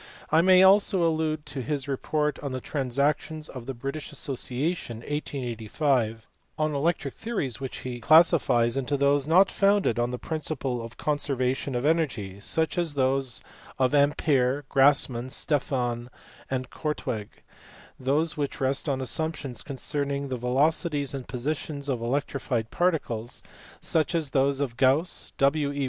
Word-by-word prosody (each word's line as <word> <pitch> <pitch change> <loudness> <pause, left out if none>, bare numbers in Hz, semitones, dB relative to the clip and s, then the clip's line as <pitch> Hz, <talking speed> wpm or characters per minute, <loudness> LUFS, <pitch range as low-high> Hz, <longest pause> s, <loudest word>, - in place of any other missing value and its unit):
I 160 +2 +6
may 185 +1 +6
also 190 -2 +5
allude 155 -1 -1
to 140 -3 -4
his 145 +1 -2
report 150 +2 -1
in 140 -2 -4
the 130 - -2
Transactions 145 +4 -1
of 130 -2 -9
the 135 - -4
British 140 +6 -5
Association, 135 -1 -2
1885, 120 -4 -2 0.3
on 155 -1 0
electric 145 -1 0
theories, 195 - -3
which 135 -1 -5
he 125 -1 -4
classifies 130 -5 +4
into 135 +1 -1
those 140 0 +2
not 185 +5 +5
founded 200 - +2
on 120 0 +1
the 125 - -3
principle 140 -5 -3
of 115 0 -10
the - - -12
conservation 135 -3 0
of 120 +3 -1
energy 125 - 0
(such 160 - 0
as 165 -4 -1
those 130 -2 0 0.3
of 130 +1 +2
Ampere, 145 -2 +2
Grassmann, 135 -3 +3
Stefan, 125 -4 -1 0.4
and 130 -1 -3
Korteweg); 130 -9 -4 0.6
those 150 +5 +1
which 145 -1 -3
rest 135 +2 0
on 135 -1 -1
assumptions 140 -2 -2
concerning 140 0 -3
the 130 - -2
velocities 145 +3 +1
and 135 -2 -6
positions 140 +2 -3
of 125 -4 -1
electrified 125 -2 -2
particles 135 -10 -1 0.4
(such 160 +2 +1
as 155 -5 -1
those 140 0 +2
of 120 -4 -3
Gauss, 140 +7 +2
W. 140 +1 +2
E. 145 - -5
140 Hz, 145 wpm, -26 LUFS, 125-155 Hz, 0.6 s, I